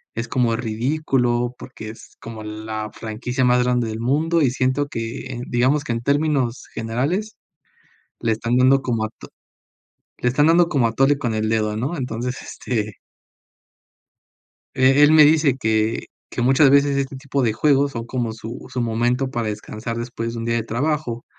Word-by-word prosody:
es 115 +1 -3
como 120 -3 +1
ridículo, 120 +1 0
porque 110 -4 -9
es 115 - -13
como 115 -2 -8
la 110 0 -5
franquicia 120 +3 -2
más 125 0 +4
grande 125 -2 +1
del 110 - -5
mundo, 160 +7 +1
y 140 - +4
siento 130 +3 0
que, 120 +1 -5
digamos, 130 +5 +2
que 120 - -4
en 115 - -3
términos 140 -3 0
generales, 145 - -2 0.8
le 115 -1 0
están 115 +3 -1
dando 135 +2 +5
como 115 -4 -1
ato 110 - -10 0.9
le 125 - +1
están 145 +5 +3
dando 170 +1 +4
como 125 -5 +2
atole 135 +5 +2
con 120 -5 -2
el 110 0 0
dedo, 110 -1 0
¿no? 135 +10 -2
Entonces, 125 -1 -3
este 110 -4 -4 1.8
eh, 135 +2 +5
él 150 - +7
me 155 -1 +8
dice 150 -3 +4
que 110 -2 0 0.3
que 120 - -3
muchas 135 +3 +5
veces 140 0 +4
este 135 0 -2
tipo 140 0 -2
de 110 -3 +2
juegos 140 +2 +2
son 115 -1 -6
como 120 -3 -2
su 115 +1 -8
su 130 -1 -2
momento 120 +3 0
para 120 -3 -2
descansar 110 +2 -5
después 115 -1 -4
de 115 - -5
un 115 - -4
día 115 - 0
de 115 - 0
trabajo, 120 0 -2
125 Hz, 170 wpm, -21 LUFS, 115-140 Hz, 1.8 s, me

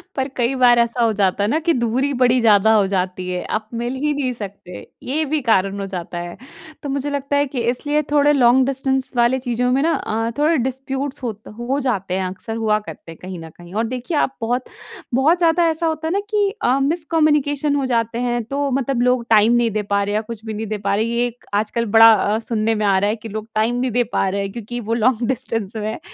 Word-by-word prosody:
पर 265 -1 -1
कई 240 +1 0
बार 245 -2 +5
ऐसा 235 +1 +1
हो 225 - +3
जाता 200 -1 +1
है - - +1
ना 310 - +1
कि 335 +1 +1
दूरी 255 +3 0
बड़ी 250 0 +4
ज़्यादा 220 -1 +5
हो 210 -2 +4
जाती 185 -1 -2
है, 180 0 -3
आप 215 0 -3
मिल 240 +2 -3
ही 295 +3 0
नहीं 275 -3 -1
सकते, 200 -5 -9 0.2
ये 305 +5 -1
भी 300 +1 -1
कारण 200 -5 +1
हो 195 - -3
जाता 175 -2 -6
है। 175 +2 -7 0.5
तो 285 - -4
मुझे 280 +1 -2
लगता 285 0 -1
है 285 - +3
कि 260 -1 -5
इसलिए 290 +4 -1
थोड़े 295 0 +4
लॉन्ग 255 -1 +4
डिस्टेंस 265 -1 -1
वाले 240 +2 +3
चीज़ों 250 0 -1
में 270 +2 +2
ना 330 +1 +2
अ 225 +1 -2
,थोड़े 315 +2 +3
डिस्प्यूट्स 265 +2 -3
होत 220 -3 -5
हो 255 +4 -1
जाते 205 -9 -2
हैं, 190 0 -1
अक्सर 195 +4 -6
हुआ 215 -2 +1
करते 200 -5 -11
हैं 165 - -12
कहीं 185 -1 -7
न 165 0 -9
कहीं। 175 +2 -15
और 220 +2 0
देखिए 255 +6 -3
आप 270 - 0
बहुत 245 +3 -1 0.5
बहुत 290 +8 +3
ज़्यादा 340 0 +3
ऐसा 320 +1 -2
होता 320 0 -2
है 325 - -1
ना 395 - +1
कि 415 -2 +2
अ, 255 +3 +3
मिसकम्युनिकेशन 300 -1 +1
हो 280 -2 0
जाते 230 -2 -1
हैं, 240 -1 -1
तो 280 +4 -2
मतलब 265 -1 0
लोग 250 -1 +2
टाइम 220 +1 +5
नहीं 240 -1 +2
दे 215 0 -1
पा 200 0 0
रहे 205 +1 -2
या 215 - +1
कुछ 220 0 -9
भी 220 - -4
नहीं 215 +1 -4
दे 215 +1 -3
पा 200 0 -1
रहे। 215 - +1
ये 235 +1 0
एक 240 0 -12
आजकल 215 +3 0
बड़ा 225 0 +10
अ, 210 +1 +1
सुनने 225 -1 -1
में 210 0 -1
आ 195 -1 +3
रहा 200 +2 +1
है 215 - 0
कि 225 0 -10
लोग 215 +1 -6
टाइम 220 +3 +1
नहीं 255 - -1
दे 245 +2 +2
पा - - +1
रहे 200 +1 -2
हैं 195 0 -4
क्योंकि 240 +2 -6
वो 230 0 -3
लॉन्ग 235 0 +1
डिस्टेंस 230 -5 -3
में 215 -1 -3
है, - - -7
240 Hz, 250 wpm, -20 LUFS, 215-270 Hz, 0.5 s, बड़ा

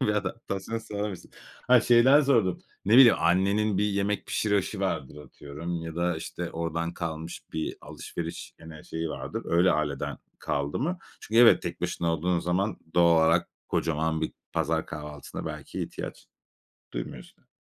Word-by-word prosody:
bir - - +1
adaptasyon 105 +1 -3
sever 105 -1 -4
misin? 95 - -10 0.4
Hayır, 125 -2 +6
şeyden 125 +5 +6
sordum; 115 -10 +2 0.3
ne 105 - +1
bileyim 130 -3 +9
annenin 95 +4 +2
bir 105 - +2
yemek 100 0 -1
pişirişi 105 -3 0
vardır 65 - -2
atıyorum 80 +4 -6
ya 80 0 -7
da, 85 -1 0
işte, 85 +2 -5
oradan 85 +1 -3
kalmış 80 -1 -5
bir 80 0 -3
alışveriş 85 -1 -7
gene 80 -2 -11
şeyi 80 0 -4
vardır. - - -5
Öyle, 85 +2 +3
aileden 75 -2 -2 0.2
kaldı 70 0 -2
mı? 170 +7 -1 0.2
Çünkü 115 +2 +3
evet, 120 - +7
tek - - -5
başına 85 -1 -1
olduğun 85 +2 0
zaman 95 +4 0 0.2
doğal 85 -1 +5
olarak 85 +1 +3 0.2
kocaman 80 0 0
bir 80 - -2 0.2
pazar - - 0
kahvaltısına 75 -1 -7
belki - - -5
ihtiyaç - - -7 0.7
duymuyorsun. - - -8
85 Hz, 150 wpm, -27 LUFS, 80-105 Hz, 0.7 s, bileyim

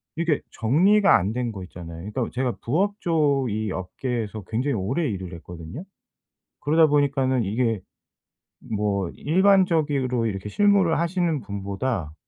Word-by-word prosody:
이렇게 165 -2 0
정리가 190 - +4
안 100 +5 -2
된 125 -1 -2
거 95 -4 -7
있잖아요. 85 +1 -9
이 - - -9
또 125 -4 -1
제가 125 -1 -1
부업 200 - 0
쪽 145 -6 +2
이 110 -1 -2
업계에서 110 +3 -4
굉장히 125 +5 0
오래 130 - -1
일을 95 -4 -5
했거든요. 85 - -9 0.8
그러다 160 +2 +4
보니까는 135 -4 +2
이게 115 +1 0 1.0
뭐 100 -3 0
일반적으로 155 -8 +2
이렇게 100 -1 -4
실무를 200 - +3
하시는 170 -2 0
분보다 100 - -3
125 Hz, 310 characters per minute, -24 LUFS, 100-160 Hz, 1.0 s, 정리가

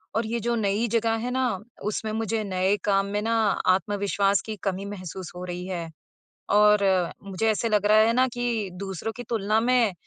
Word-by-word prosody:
और 225 +1 +1
ये 235 +1 -1
जो 235 +1 0
नई 215 +1 0
जगह 230 -1 +2
है 250 - -2
ना, 250 -6 0 0.3
उसमें 215 +1 -2
मुझे 220 0 -1
नए 190 0 +1
काम 195 -1 +2
में 205 +1 -2
ना 225 +1 0 0.4
आत्मविश्वास 200 +1 +2
की 220 - -4
कमी 195 0 -2
महसूस 185 -3 -7
हो 180 - -6
रही 180 0 -5
है। 170 -3 -4 0.6
और 210 0 +5 0.4
मुझे 200 +3 -2
ऐसे 220 +2 0
लग 210 -1 +2
रहा 215 +1 +5
है 225 +1 +4
ना 255 +2 +3
कि 235 -5 -1
दूसरों 195 +2 -4
की 245 - -5
तुलना 215 -1 +1
में 240 -4 +3
210 Hz, 190 wpm, -25 LUFS, 195-225 Hz, 0.6 s, और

